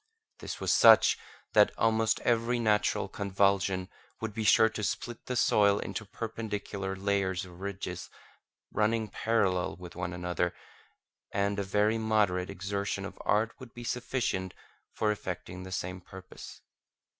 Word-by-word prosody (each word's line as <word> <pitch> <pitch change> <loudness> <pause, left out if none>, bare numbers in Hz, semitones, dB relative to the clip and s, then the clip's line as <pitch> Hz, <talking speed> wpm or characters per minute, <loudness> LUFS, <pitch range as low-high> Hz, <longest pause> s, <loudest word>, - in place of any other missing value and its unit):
This - - -6
was - - +1
such - - +7 0.4
that - - +6
almost 110 -1 +2
every 120 +1 +2
natural 105 -3 +2
convulsion 100 -1 +1 0.3
would 110 -2 -4
be 110 +1 -3
sure 110 +1 +6
to 110 -1 -5
split 120 +3 -4
the 125 - -2
soil 100 -3 +4
into 110 - -4
perpendicular 105 -3 -4
layers 95 -1 0
or 90 - -12
ridges 95 0 -6 0.6
running 110 0 +1
parallel 95 -6 +1
with 90 -1 -11
one 90 0 -3
another, 90 0 -2 0.8
and 100 +1 0
a - - 0
very 105 +3 +2
moderate 105 -5 +1
exertion 100 0 -3
of - - -9
art 110 +2 +2
would 130 -3 -12
be 120 - -8
sufficient 120 -6 -2 0.4
for 105 - 0
effecting 90 -3 -5
the 95 0 -8
same 90 0 -4
purpose. 95 +1 -11
100 Hz, 140 wpm, -30 LUFS, 95-110 Hz, 0.8 s, such